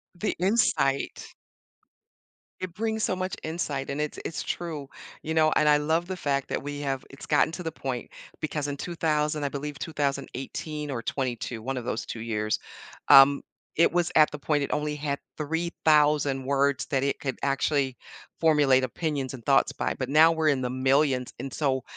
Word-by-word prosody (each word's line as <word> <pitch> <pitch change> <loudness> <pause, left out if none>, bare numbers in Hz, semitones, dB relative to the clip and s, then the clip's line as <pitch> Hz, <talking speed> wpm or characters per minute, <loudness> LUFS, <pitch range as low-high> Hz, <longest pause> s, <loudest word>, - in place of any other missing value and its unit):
The 175 - -1
insight. 180 -8 +1 1.3
It 185 -2 -5
brings 220 0 -1
so 185 - +1
much 185 +1 -3
insight, 150 -4 -3
and 140 +1 -3
it's 150 - -3
it's 165 - -3
true, 155 -5 -4 0.4
you 160 - -2
know, 155 -1 +4
and 150 - +3
I 150 0 +6
love 160 +3 +1
the 185 0 -4
fact 140 -4 -1
that - - -2
we 145 +1 -5
have 135 -2 -2
it's 135 - -11
gotten 150 +1 +3
to 180 - -5
the 160 - -3
point 130 -5 -5 0.3
because 150 -2 -2
in 145 0 -4
2000, 150 -2 -1
I 140 - 0
believe 145 0 -5
2018 145 0 -3
or 120 -3 -3
'22 120 -2 -3
one 135 +2 -3
of 125 - -5
those - - -2
2 115 - -6
years, 110 -2 -1 0.5
um, 140 +1 +8 0.3
it 165 - +4
was 175 0 +1
at 155 -1 +7
the 150 - -5
point 145 0 0
it - - -3
only 150 0 -1
had 145 -1 -2 0.2
3,000 150 -3 +2
words 140 0 +1
that 135 -2 0
it 140 - 0
could 135 -2 -3
actually 135 -1 0 0.4
formulate 145 -5 +4
opinions 140 0 -2
and 125 -3 -9
thoughts 140 - +4
by, - - -2
but 130 -1 -3
now 155 +3 +7
we're 160 -1 +2
in 135 -3 +1
the 125 - -1
millions, 130 0 +1
and 135 +2 -5
so 130 -3 0
145 Hz, 185 wpm, -27 LUFS, 135-155 Hz, 1.3 s, um